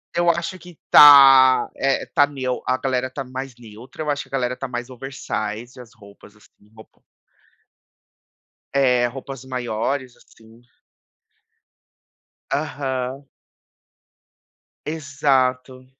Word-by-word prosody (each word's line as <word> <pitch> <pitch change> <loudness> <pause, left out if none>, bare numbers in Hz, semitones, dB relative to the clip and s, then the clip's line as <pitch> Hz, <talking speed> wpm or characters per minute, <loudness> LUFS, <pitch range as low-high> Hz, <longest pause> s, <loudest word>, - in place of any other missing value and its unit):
eu 175 0 +2
acho 170 +2 -2
que 175 -1 -15
tá, 135 -3 +8
eh, 135 0 -1
tá 145 - +4
neu 130 -3 -4
a 130 0 +1
galera 130 -1 -2
tá 135 +1 -6
mais 130 0 -8
neutra, 120 +6 -11
eu 150 - -1
acho 145 0 -3
que - - -22
a - - -36
galera 125 -2 -2
tá 135 - -6
mais 125 +1 -6
oversize, 120 -2 -6
as 120 - -16
roupas 100 -1 -18
assim, 105 0 -25
roupão 110 - -18 1.7
É, 125 -3 +3
roupas 135 +1 -9
maiores, 125 +1 -4
assim. 115 +1 -21 1.9
Aham. 130 0 -4 1.6
Exato. 130 -4 -1
130 Hz, 115 wpm, -21 LUFS, 125-140 Hz, 1.9 s, tá